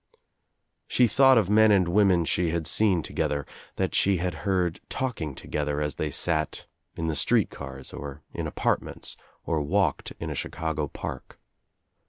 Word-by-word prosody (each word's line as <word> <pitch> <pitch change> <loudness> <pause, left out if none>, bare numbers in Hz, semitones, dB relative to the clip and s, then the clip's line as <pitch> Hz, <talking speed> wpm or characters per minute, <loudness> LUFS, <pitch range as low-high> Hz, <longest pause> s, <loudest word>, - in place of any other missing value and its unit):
r 470 - -32 0.7
She 125 - +4
thought 135 +2 +6
of 105 -5 +3
men 110 +2 +6
and 95 -4 +4
women 90 -2 +4
she 85 +1 +1
had 85 0 -1
seen 95 -5 +2
to - - -7
gether, 70 -1 -1 0.3
that - - -1
she 100 -1 +3
had 90 +1 -1
heard 90 +1 0
talliing 90 - -3
together 75 +1 -2
as 75 -1 -1
they 75 - -1
sat 80 +2 -1 0.3
in 80 - -3
the 80 -1 -1
street - - +2
cars 70 -1 -9
or 70 0 -7
in - - -3
apartments - - -2 0.3
or 80 -2 0
walked 75 - 0
m - - -4
a - - -2
Chicago 80 -2 -2
park. - - -7
85 Hz, 170 wpm, -27 LUFS, 75-100 Hz, 0.7 s, thought